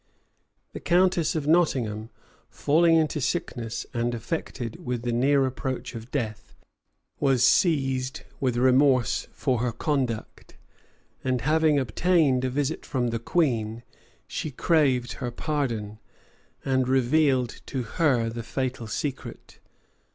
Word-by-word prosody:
The -, -, -6 dB
countess 180 Hz, -2 st, +2 dB
of 155 Hz, -3 st, -1 dB
Nottingham, 125 Hz, -10 st, +1 dB, 0.4 s
falling 165 Hz, +3 st, +3 dB
into 155 Hz, -2 st, +1 dB
sickness, 120 Hz, -6 st, -3 dB
and 120 Hz, 0 st, -1 dB
affected 120 Hz, -2 st, -5 dB
with 120 Hz, -2 st, -3 dB
the 120 Hz, -, -1 dB
near 135 Hz, +3 st, +3 dB
approach 130 Hz, -1 st, -4 dB
of 115 Hz, 0 st, -8 dB
death, 110 Hz, -7 st, -4 dB, 0.6 s
was 135 Hz, -4 st, +3 dB
seized 135 Hz, -4 st, +2 dB, 0.2 s
with 125 Hz, -3 st, 0 dB
remorse 130 Hz, 0 st, +3 dB
for 130 Hz, -4 st, -1 dB
her 120 Hz, 0 st, 0 dB
conduct; 125 Hz, -2 st, -3 dB, 0.7 s
and 130 Hz, -2 st, 0 dB
having 155 Hz, +3 st, +3 dB
obtained 140 Hz, +1 st, +2 dB
a 130 Hz, -, 0 dB
visit 145 Hz, +4 st, -2 dB
from 125 Hz, -4 st, -1 dB
the 115 Hz, 0 st, -2 dB
queen, 115 Hz, -6 st, 0 dB, 0.4 s
she 155 Hz, -, -4 dB
craved 135 Hz, -4 st, +1 dB
her 125 Hz, -, -1 dB
pardon, 120 Hz, -7 st, -3 dB, 0.7 s
and 130 Hz, -2 st, +1 dB
revealed 130 Hz, -1 st, +2 dB
to 130 Hz, -2 st, -3 dB
her 120 Hz, -1 st, +1 dB
the 115 Hz, +1 st, -4 dB
fatal 125 Hz, 0 st, -3 dB
secret. 135 Hz, +4 st, -5 dB
130 Hz, 120 wpm, -26 LUFS, 120-145 Hz, 0.7 s, falling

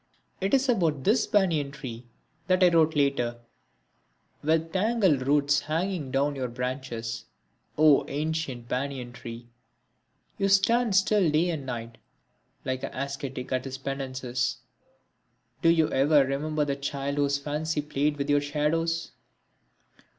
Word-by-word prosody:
It 195 Hz, +1 st, -1 dB
was 270 Hz, 0 st, +4 dB
about 165 Hz, -, +1 dB
this 215 Hz, +5 st, +3 dB
banyan 170 Hz, -9 st, +2 dB
tree 130 Hz, -4 st, -8 dB, 0.4 s
that 185 Hz, 0 st, +3 dB
I 180 Hz, -, +7 dB
wrote 160 Hz, -2 st, +3 dB
later: 140 Hz, -5 st, +1 dB, 1.0 s
With 160 Hz, +2 st, 0 dB
tangled 190 Hz, -, +2 dB
roots 145 Hz, 0 st, +3 dB
hanging 160 Hz, +1 st, -2 dB
down 135 Hz, +2 st, +1 dB
from -, -, -8 dB
your 130 Hz, -1 st, -2 dB
branches, 125 Hz, -2 st, -4 dB, 0.5 s
O 150 Hz, -2 st, +6 dB
ancient 145 Hz, -5 st, -3 dB
banyan 130 Hz, -1 st, -3 dB
tree, 115 Hz, -1 st, -9 dB, 0.9 s
You 195 Hz, -, +2 dB
stand 215 Hz, +3 st, +3 dB
still 190 Hz, -2 st, +4 dB
day 160 Hz, +4 st, +2 dB
and 145 Hz, -5 st, -5 dB
night, 115 Hz, -2 st, -6 dB, 0.7 s
like 130 Hz, 0 st, -2 dB
an -, -, -6 dB
ascetic 135 Hz, -1 st, -5 dB
at 130 Hz, 0 st, -1 dB
his 135 Hz, 0 st, -5 dB
penances, 130 Hz, -2 st, -3 dB, 1.0 s
Do 165 Hz, -, +4 dB
you 165 Hz, -2 st, +4 dB
ever 140 Hz, +1 st, +4 dB
remember 150 Hz, +3 st, -1 dB
the 140 Hz, -1 st, -1 dB
child 140 Hz, 0 st, -3 dB
whose 140 Hz, -1 st, +2 dB
fancy 150 Hz, +2 st, -2 dB
played 150 Hz, 0 st, 0 dB
with 140 Hz, 0 st, -2 dB
your 145 Hz, -1 st, +3 dB
shadows? 165 Hz, +3 st, -1 dB
145 Hz, 135 wpm, -27 LUFS, 130-165 Hz, 1.0 s, I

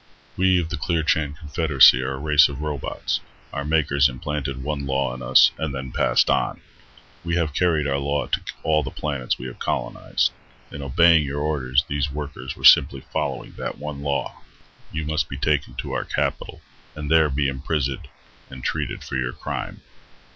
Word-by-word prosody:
"We 95 Hz, -1 st, +3 dB
of 80 Hz, -2 st, -3 dB
the 85 Hz, -, -3 dB
Clearchan 80 Hz, -2 st, 0 dB
Confederacy 75 Hz, -5 st, +5 dB
are 65 Hz, +1 st, -2 dB
a -, -, -5 dB
race 75 Hz, +1 st, +5 dB
of 70 Hz, 0 st, -7 dB
robots. 75 Hz, -4 st, -3 dB, 0.3 s
Our 70 Hz, -, -3 dB
makers 75 Hz, -2 st, +2 dB
implanted 70 Hz, +1 st, -4 dB
one 70 Hz, -1 st, -3 dB
law 65 Hz, -1 st, 0 dB
in 65 Hz, -, -8 dB
us, 65 Hz, +1 st, +6 dB
and 75 Hz, -3 st, -3 dB
then 65 Hz, -1 st, -6 dB
passed -, -, +2 dB
on. -, -, 0 dB, 0.6 s
We 85 Hz, 0 st, -1 dB
have 80 Hz, -4 st, 0 dB
carried 80 Hz, -3 st, +1 dB
our 70 Hz, -1 st, 0 dB
law 70 Hz, +1 st, -1 dB
to -, -, -1 dB, 0.2 s
all 75 Hz, -1 st, +2 dB
the 65 Hz, -, -4 dB
planets 70 Hz, -3 st, -2 dB
we -, -, -8 dB
have 60 Hz, -, -8 dB
colonized. -, -, -1 dB, 0.4 s
In 70 Hz, -, -7 dB
obeying 80 Hz, +4 st, +4 dB
your 70 Hz, +1 st, -3 dB
orders, 70 Hz, -2 st, +1 dB
these 70 Hz, -1 st, -1 dB
workers 70 Hz, -3 st, -6 dB
were -, -, -14 dB
simply 70 Hz, -, +7 dB
following -, -, -3 dB
that -, -, -4 dB
one 75 Hz, -2 st, -6 dB
law. 70 Hz, -1 st, -3 dB, 0.5 s
You 80 Hz, -1 st, -3 dB
must 80 Hz, 0 st, -1 dB
be 65 Hz, -, -6 dB
taken 75 Hz, 0 st, 0 dB
to -, -, -5 dB
our -, -, -2 dB
capital, -, -, -3 dB, 0.3 s
and 75 Hz, 0 st, -5 dB
there 80 Hz, -2 st, +5 dB
be 70 Hz, +1 st, 0 dB
imprisoned 70 Hz, 0 st, -2 dB, 0.4 s
and 65 Hz, -2 st, -10 dB
treated -, -, -3 dB
for -, -, -4 dB
your 65 Hz, 0 st, -2 dB
crime." -, -, -6 dB
70 Hz, 180 wpm, -23 LUFS, 65-75 Hz, 0.6 s, simply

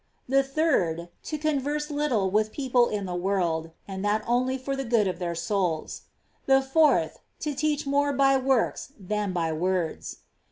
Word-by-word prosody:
The 270 Hz, +2 st, +4 dB
third, 265 Hz, -, 0 dB, 0.2 s
to 305 Hz, -, -3 dB
converse 300 Hz, 0 st, -1 dB
little 260 Hz, -10 st, 0 dB
with 215 Hz, +1 st, +1 dB
people 250 Hz, -3 st, +2 dB
in 205 Hz, -2 st, -3 dB
the 180 Hz, -, -4 dB
world, 175 Hz, -3 st, -1 dB, 0.2 s
and 190 Hz, -1 st, -5 dB
that 210 Hz, +1 st, +1 dB
only 255 Hz, +2 st, +1 dB
for 275 Hz, +1 st, -3 dB
the 270 Hz, -, -3 dB
good 230 Hz, -4 st, +2 dB
of 185 Hz, -1 st, -3 dB
their 170 Hz, -2 st, -2 dB
souls. 175 Hz, -2 st, -2 dB, 0.4 s
The 270 Hz, 0 st, +6 dB
fourth, 300 Hz, +3 st, +2 dB, 0.2 s
to 300 Hz, -, -2 dB
teach 300 Hz, +1 st, -1 dB
more 285 Hz, +1 st, +2 dB
by 275 Hz, 0 st, +4 dB
works 265 Hz, +1 st, 0 dB
than 205 Hz, +1 st, -2 dB
by 165 Hz, -3 st, -1 dB
words. 175 Hz, 0 st, -2 dB
240 Hz, 165 wpm, -26 LUFS, 185-275 Hz, 0.4 s, The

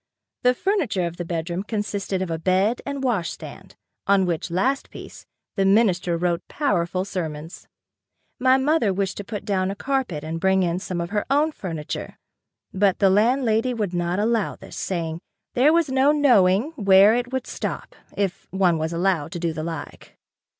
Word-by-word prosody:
The 250 Hz, 0 st, +3 dB
furniture 300 Hz, -, 0 dB
of 170 Hz, 0 st, -5 dB
the 175 Hz, -, -4 dB
bedroom 170 Hz, +1 st, -3 dB
consisted 205 Hz, -2 st, -3 dB
of 175 Hz, -, -5 dB
a 165 Hz, -, -2 dB
bed 190 Hz, +7 st, +1 dB
and 280 Hz, -1 st, -4 dB
wash 215 Hz, -10 st, 0 dB
stand -, -, -10 dB, 0.3 s
on 195 Hz, -1 st, +4 dB
which 170 Hz, 0 st, -2 dB
last 255 Hz, +11 st, 0 dB
piece, -, -, -11 dB, 0.3 s
the 195 Hz, -, +1 dB
minister 190 Hz, -4 st, +3 dB
wrote 175 Hz, 0 st, 0 dB
powerful 185 Hz, -, -1 dB
sermons. 160 Hz, -3 st, -6 dB, 0.7 s
My 260 Hz, +1 st, +5 dB
mother 270 Hz, -5 st, +2 dB
wished 190 Hz, 0 st, -2 dB
to 205 Hz, -, -5 dB
put 205 Hz, +1 st, -6 dB
down 190 Hz, -2 st, 0 dB
a 195 Hz, -, -3 dB
carpet 255 Hz, -, -2 dB
and 160 Hz, +1 st, -4 dB
bring 190 Hz, +1 st, +3 dB
in 175 Hz, 0 st, 0 dB
some 180 Hz, -2 st, -4 dB
of 170 Hz, -, -5 dB
her 210 Hz, -1 st, -1 dB
own 295 Hz, +3 st, +3 dB
furniture, 165 Hz, -, -6 dB, 0.6 s
but 195 Hz, 0 st, +2 dB
the 195 Hz, -2 st, +4 dB
landlady 230 Hz, +2 st, +2 dB
would 205 Hz, -5 st, -2 dB
not 175 Hz, +1 st, -1 dB
allow 220 Hz, 0 st, 0 dB
this, -, -, -12 dB
saying, 165 Hz, -3 st, -3 dB, 0.3 s
"There 270 Hz, +5 st, +4 dB
was 330 Hz, -3 st, +2 dB
no 265 Hz, +2 st, +4 dB
knowing 240 Hz, -, +4 dB
where 200 Hz, -6 st, +5 dB
it 245 Hz, +1 st, -1 dB
would 260 Hz, -1 st, -2 dB
stop, -, -, -5 dB, 0.2 s
if 195 Hz, -2 st, -2 dB
one 180 Hz, -4 st, +2 dB
was 160 Hz, +1 st, -2 dB
allowed 170 Hz, -3 st, 0 dB
to 175 Hz, -, -4 dB
do 165 Hz, -1 st, -1 dB
the 155 Hz, -, -4 dB
like." 165 Hz, -3 st, -7 dB
195 Hz, 180 wpm, -23 LUFS, 175-240 Hz, 0.7 s, My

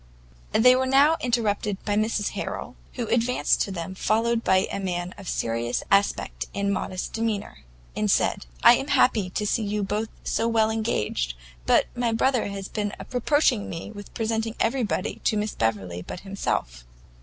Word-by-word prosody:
They 250 Hz, +3 st, +6 dB
were 260 Hz, 0 st, +1 dB
now 280 Hz, +4 st, +5 dB
interrupted 215 Hz, -4 st, 0 dB
by 205 Hz, -, 0 dB
Mrs 215 Hz, -1 st, +1 dB
Harrel, -, -, -5 dB, 0.2 s
who 245 Hz, -, -3 dB
advanced 235 Hz, +2 st, +2 dB
to 200 Hz, -, 0 dB
them 180 Hz, 0 st, -5 dB
followed 230 Hz, +4 st, +1 dB
by 190 Hz, -, +4 dB
a -, -, -8 dB
young 195 Hz, -, -3 dB
man 175 Hz, -1 st, -2 dB
of 200 Hz, -2 st, -11 dB
a -, -, -2 dB
serious 115 Hz, +1 st, -1 dB
aspect 200 Hz, +1 st, +1 dB
and 200 Hz, 0 st, 0 dB
modest 185 Hz, -1 st, -3 dB
demeanour, 220 Hz, -2 st, -2 dB, 0.4 s
and -, -, 0 dB
said, -, -, +1 dB, 0.2 s
"I 240 Hz, -, +9 dB
am 270 Hz, -, -4 dB
happy 215 Hz, -10 st, +3 dB
to 210 Hz, +3 st, -2 dB
see 225 Hz, -, +1 dB
you 210 Hz, 0 st, -1 dB
both 210 Hz, +3 st, -2 dB
so 230 Hz, -, 0 dB
well 220 Hz, -1 st, +3 dB
engaged; 105 Hz, -, -1 dB, 0.3 s
but -, -, +5 dB
my 240 Hz, -1 st, 0 dB
brother 250 Hz, +1 st, +2 dB
has 200 Hz, -1 st, -5 dB
been 205 Hz, -2 st, -3 dB, 0.2 s
reproaching 250 Hz, -3 st, +2 dB
me 165 Hz, +5 st, -6 dB
with 205 Hz, -1 st, -10 dB
presenting 225 Hz, 0 st, -1 dB
everybody 225 Hz, -4 st, -1 dB
to 215 Hz, -, +2 dB
Miss 210 Hz, +1 st, -1 dB
Beverley 95 Hz, -6 st, -1 dB
but 180 Hz, -, -8 dB
himself." -, -, -3 dB
210 Hz, 175 wpm, -25 LUFS, 190-230 Hz, 0.4 s, I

